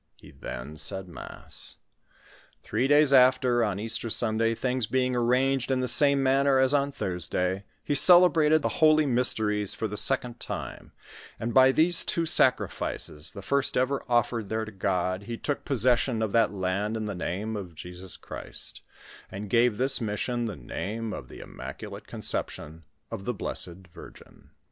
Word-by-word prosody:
He - - -16
then 75 +6 -8
said 95 +5 -5
mass. 85 - -9 0.9
Three 130 - -1
days 145 0 +4
after, 125 -2 +4
on 100 -3 -2
Easter 115 +2 -3
Sunday, 115 0 +1
things 125 -1 -2
being 130 0 0
arranged 125 +2 +1
in 130 -1 +1
the 130 - -1
same 140 +3 +5
manner 135 +1 +3
as 130 +1 +3
on 140 0 +1
Thursday, 90 - -2 0.2
he - - -1
celebrated 160 -2 +6
the - - +1
holy 155 -1 +5
mysteries 110 -6 0
for 110 - -3
the 105 - -6
second 120 +2 +1
time, - - -7 0.5
and 115 +1 -3
by 130 0 +6
these 165 +4 +4
two 170 - 0
sac 160 -6 +5
rifices, 75 +1 -4
the 100 - -8
fii*8t 140 +7 0
ever 130 +2 0
offered 120 -3 0
there 110 0 -2
to 110 - -9
God, 95 -1 -2
he 115 0 -5
took 145 +3 -4
possession 125 -2 +2
of 110 - -2
that 115 +1 +2
land 100 +3 -2
in 110 - -4
the 105 - -4
name 100 +5 -4
of 90 -5 -7
Jesns 90 +3 -9
Christ, - - -7 0.5
and 100 +1 -8
gave 120 -2 +3
this 130 +1 +1
mis 105 -2 -3
sion 120 -1 -2
the 105 -4 -4
name 105 - -5
of 65 - -8
the - - -11
Immaculate - - -9
Conception 80 +2 -4 0.3
of 100 - -6
the 125 - -2
Blessed 90 0 -4
Virgin. 80 - -15
115 Hz, 165 wpm, -27 LUFS, 100-130 Hz, 0.9 s, celebrated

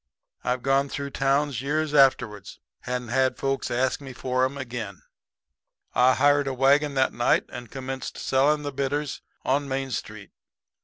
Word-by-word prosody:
I've 125 0 -1
gone 135 +1 +2
through 140 0 -4
towns 135 -2 +1
years 150 +2 -1
afterwards 125 -8 +2 0.3
and 125 -2 -3
had 130 +1 +2
folks 135 0 -1
ask 130 +3 0
for 130 +1 0
'em 135 +2 -4
again. 120 -7 -6 0.9
"I 125 +2 +5
hired 145 0 +3
a 135 - -2
wagon 140 +2 +3
that 130 0 +2
night 120 - +2
and 120 -2 -8
commenced 130 0 -6
selling 150 +3 +2
the 145 -1 -4
bitters 140 +1 -2 0.2
on 140 +2 +1
Main 135 0 -2
Street. 110 -3 -6
135 Hz, 150 wpm, -25 LUFS, 125-140 Hz, 0.9 s, I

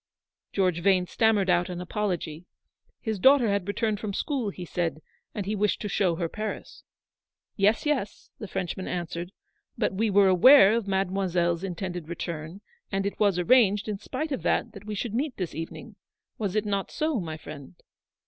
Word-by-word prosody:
George 180 -4 +1
Vane 185 -1 +3
stammered 215 0 +2
out 175 0 +2
an 175 -1 -5
apology. 180 -3 -3 0.5
His 220 -4 -3
daughter 265 0 +6
had 200 -2 0
returned 210 +1 -1
from 205 -2 -4
school, 265 -7 -1
he 180 -2 -7
said, 165 -2 -3 0.3
and 205 -3 -3
he 210 +2 -1
wished 210 0 +1
to - - -2
show 185 -4 +1
her 170 0 -2
Paris. 215 +5 -6 0.7
"Yes, 210 +5 +2
yes," 280 -9 -2
the 210 - -6
Frenchman 190 -1 -4
answered; 175 0 -4 0.5
"but - - 0
we 220 +3 +1
were 200 0 +5
aware 200 +4 +8
of 230 -3 -1
Mademoiselle's 185 -3 0
intended 180 -3 -4
return, 170 +1 -5 0.3
and 195 0 -1
it 200 - -3
was 200 -4 +3
arranged 205 +1 +4
in 210 -2 -3
spite 310 +8 -4
of 270 - -2
that - - 0
that 200 -1 -12
we 210 - -3
should 215 +2 -3
meet 265 +3 -2
this 180 -3 -3
evening: 165 +2 -7 0.4
was 205 -3 -2
it 215 0 +1
not 200 -2 -1
so, 310 -5 -1
my 160 -4 -5
friend?" 140 - -10
195 Hz, 175 wpm, -27 LUFS, 175-215 Hz, 0.7 s, aware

